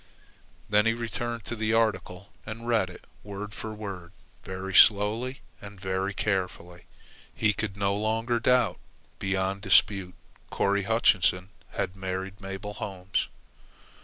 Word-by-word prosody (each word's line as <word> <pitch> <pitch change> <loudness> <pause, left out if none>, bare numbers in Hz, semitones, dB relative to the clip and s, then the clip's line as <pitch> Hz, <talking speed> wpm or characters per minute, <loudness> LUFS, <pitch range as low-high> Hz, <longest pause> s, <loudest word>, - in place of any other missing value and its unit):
Then 105 +1 +4
he 115 - +3
returned 120 -1 -4
to 120 - -4
the 110 0 0
article 105 -4 0
and 115 +2 -7
read 110 -6 +2
it 90 - -12 0.2
word 100 +1 -6
for 110 - -6
word, 95 -5 -7 0.3
very 95 +1 -5
slowly 110 +7 +5 0.2
and 100 -1 -10
very 95 +1 -1
carefully. 90 -3 -2 0.5
He 105 -1 +2
could 105 -3 -4
no 100 0 +1
longer 115 +3 0
doubt. 125 +2 +3 0.4
Beyond 95 0 -1
dispute, 95 -3 +3 0.4
Corry 100 0 +1
Hutchinson 95 -5 +3 0.2
had 90 - -2
married 95 +1 -4
Mabel 95 +2 -6
Holmes. 95 -3 -2
100 Hz, 130 wpm, -28 LUFS, 95-110 Hz, 0.5 s, slowly